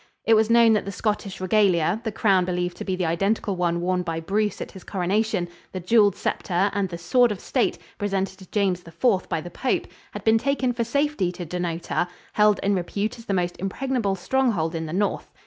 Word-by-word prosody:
It 225 - +5
was 220 0 +4
known 230 -1 +6
that 215 - +1
the 200 - -4
Scottish 200 0 -2
regalia 185 0 +2
the 220 - -2
crown 200 -4 +3
believed 180 0 -2
to - - -5
be 190 - -1
the 180 -1 -1
identical 195 +4 0
one 170 -1 0
worn 180 +1 0
by 165 -2 -3
Bruce 205 +4 -1
at - - -6
his 190 - -12
coronation, 195 0 0 0.3
the 185 - -3
jewelled 205 +2 +4
scepter 190 +2 0
and 200 -2 0
the 170 - -5
sword 235 +8 +3
of 205 - -4
state 250 +5 0 0.2
presented 195 -2 -2
to 190 - -14
James 195 -4 +1
IV 185 +4 0
by 160 - -1
the 175 +2 -9
pope 255 +8 -1 0.3
had - - -6
been 225 0 +4
taken 265 -1 0
for 235 0 -1
safety 280 -6 0
to 175 - -6
Dunnottar, 175 0 -2 0.3
held 210 -2 +4
in 200 - +2
repute 200 +5 -2
as 230 - -12
the 200 - -1
most 175 -1 -1
impregnable 205 +1 -1
stronghold 195 -6 0
in 160 -1 -3
the - - -6
North. 200 +3 -1
195 Hz, 210 wpm, -24 LUFS, 180-220 Hz, 0.3 s, known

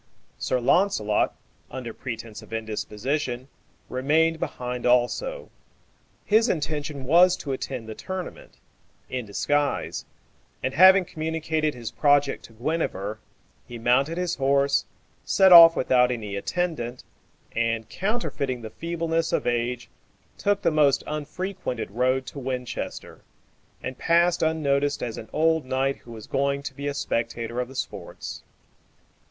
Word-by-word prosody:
Sir 130 - 0
Launcelot, 120 - +2 0.3
under 125 -3 -6
pretence 115 -3 -7
of - - -15
indisposition, 120 +4 -3 0.4
remained 160 +5 +2
behind 125 -7 -4
also. 125 - +1 0.7
His 220 +3 +4
intention 150 -3 -2
was 175 +6 +5
to 140 - -5
attend 130 -3 -4
the 110 - -5
tournament 185 - -7 0.5
in 125 -3 -3
disguise; 145 +7 -1 0.6
and 130 - -1
having 190 +3 +7
communicated 160 -2 -2
his 115 -2 -6
project 145 +2 +2
to 115 - -16
Guenever, 110 - -2 0.5
he 120 - -7
mounted 130 +8 +2
his 180 -1 -1
horse, 140 +1 +2 0.4
set 190 -1 +4
off 165 -1 +11
without 125 -1 +3
any 110 -5 -4
attendant, 125 - -2 0.5
and, 115 -1 0
counterfeiting 140 - -2
the 110 - -7
feebleness 165 +1 -2
of - - 0
age, 120 0 -1 0.5
took 205 0 0
the - - +3
most 150 -3 +3
unfrequented 150 - -4
road 130 +4 +1
to 140 - -8
Winchester, 125 -2 -5 0.6
and 130 0 -5
passed 170 +1 +3
unnoticed 145 -3 +1
as 115 -2 -4
an 110 - -10
old 160 0 +2
knight 135 +1 0
who 120 - -15
was 110 -2 -9
going 140 +1 0
to 140 - -5
be 140 +2 -5
a 145 - -1
spectator 115 -3 -2
of 125 - -1
the 135 - -13
sports. - - -6
140 Hz, 130 wpm, -25 LUFS, 120-160 Hz, 0.7 s, off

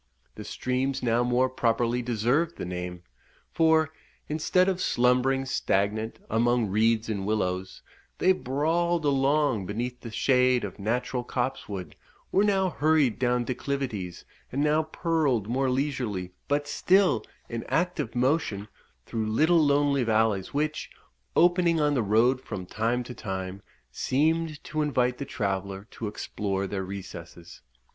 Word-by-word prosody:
The - - -8
streams 130 +1 -2
now 120 0 +2
more 125 +1 +2
properly 120 -1 0
deserved 125 +8 0
the - - -4
name, 90 0 -5 0.5
for, 160 -1 +3 0.4
instead 160 +4 +2
of 185 -1 0
slumbering 125 +1 +2
stagnant 110 -3 0
among 120 0 +2
reeds 110 +2 +2
and 105 -3 -2
willows, 95 -3 -2 0.3
they 185 - +4
brawled 165 +2 0
along 135 -6 +2
beneath 120 +4 -4
the 115 - -7
shade 125 +2 +3
of 100 -1 -6
natural 125 +4 -1
copsewood; 120 -7 -4 0.4
were 195 - +4
now 190 -3 +2
hurried 150 -7 +2
down 125 -1 +2
declivities, 120 -8 -4 0.3
and 140 +3 0
now 150 +1 +3
purled 155 - 0
more 130 +3 +1
leisurely, 125 -9 -2 0.2
but 145 0 0
still 190 +5 +3 0.2
in 115 -1 -4
active 175 -9 -1
motion, 120 -6 0 0.4
through 110 -2 -2
little 155 +9 +4
lonely 140 -2 +3
valleys, 110 -4 +1
which, 155 +2 -2 0.5
opening 175 -1 +4
on 150 -1 +2
the 130 - +2
road 115 +5 +3
from 105 -7 -6
time 115 +6 -1
to 125 - -8
time, 95 -3 -5 0.3
seemed 155 - 0
to 155 - -2
invite 125 -4 +1
the 140 - -3
traveller 100 -4 -3
to 110 - -5
explore 100 -1 -3
their 95 0 -3
recesses. 85 -3 -9
125 Hz, 135 wpm, -27 LUFS, 110-145 Hz, 0.5 s, they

